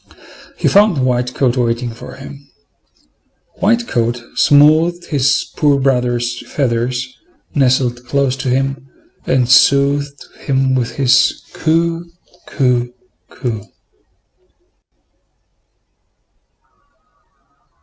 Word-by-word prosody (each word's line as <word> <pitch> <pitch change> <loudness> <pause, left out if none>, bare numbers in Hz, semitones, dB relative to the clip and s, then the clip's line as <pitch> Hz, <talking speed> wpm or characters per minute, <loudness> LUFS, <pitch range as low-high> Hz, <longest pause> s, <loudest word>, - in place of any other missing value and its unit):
He - - 0
found 200 -10 +3
White 125 0 -1
coat 130 -3 +1
waiting 120 0 -1
for 115 - -11
him. 140 +1 -12 1.1
White 235 +4 +1
coat 120 +1 -1
smoothed 155 +4 +3
his 140 -2 0
poor 145 -2 +2
brother's 125 -2 0
feathers, 125 -1 -2 0.4
nestled 125 -3 +1
close 135 -1 0
to 135 -1 -3
him, 135 +1 -2 0.4
and 130 -2 +1
soothed 140 +2 +3
him 135 -1 0
with 125 -2 -2
his 130 -2 +2
coo! 165 +1 -1 0.4
coo! 125 -3 0 0.4
coo! 115 -5 -5
135 Hz, 90 wpm, -16 LUFS, 125-145 Hz, 1.1 s, found